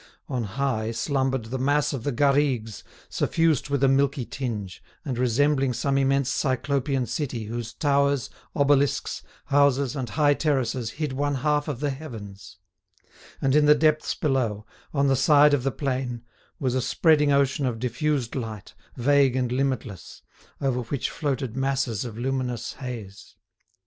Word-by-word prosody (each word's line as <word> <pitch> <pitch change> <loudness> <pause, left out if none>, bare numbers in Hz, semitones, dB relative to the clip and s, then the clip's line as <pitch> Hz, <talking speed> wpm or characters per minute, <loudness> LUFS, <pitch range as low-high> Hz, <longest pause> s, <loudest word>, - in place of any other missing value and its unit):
On 125 -4 -2
high 110 0 -1
slumbered 130 0 -1
the 130 - -2
mass 145 +2 +1
of 130 -5 -4
the 145 - -1
Garrigues, 135 -5 +1 0.2
suffused 160 -4 +1
with 140 -1 0
a - - +6
milky 135 -1 +2
tinge, 110 -9 -5 0.2
and 135 -4 -2
resembling 135 +2 +2
some 140 +3 -1
immense 135 -1 +2
Cyclopean 135 0 0
city 125 -3 -3
whose 115 +1 -5
towers, 140 -3 +1 0.2
obelisks, 140 -2 +2 0.2
houses 140 -1 +2
and 130 -4 -3
high 145 +7 +3
terraces 130 -6 0
hid 150 -3 -3
one 145 +1 0
half 150 +2 0
of 140 -4 -4
the 145 -1 0
heavens; 110 -9 -9 0.9
and 135 -1 +2
in 150 -1 +5
the 150 - +7
depths 155 0 +2
below, 120 -8 -1 0.3
on 140 -1 +1
the 135 -1 +3
side 145 +2 +5
of 145 - +2
the 135 - 0
plain, 125 -3 -3 0.4
was 130 -3 0
a 130 - +1
spreading 150 +2 +3
ocean 140 0 +2
of 120 -2 -2
diffused 130 +1 -1
light, 110 -6 -6 0.2
vague 135 0 +3
and 125 -2 0
limitless, 125 -8 -3 0.4
over 130 -3 0
which 125 +3 -3
floated 135 -5 -2
masses 135 -5 -1
of 115 -2 -7
luminous 125 -2 -2
haze. 115 -6 -8
135 Hz, 150 wpm, -25 LUFS, 120-145 Hz, 0.9 s, the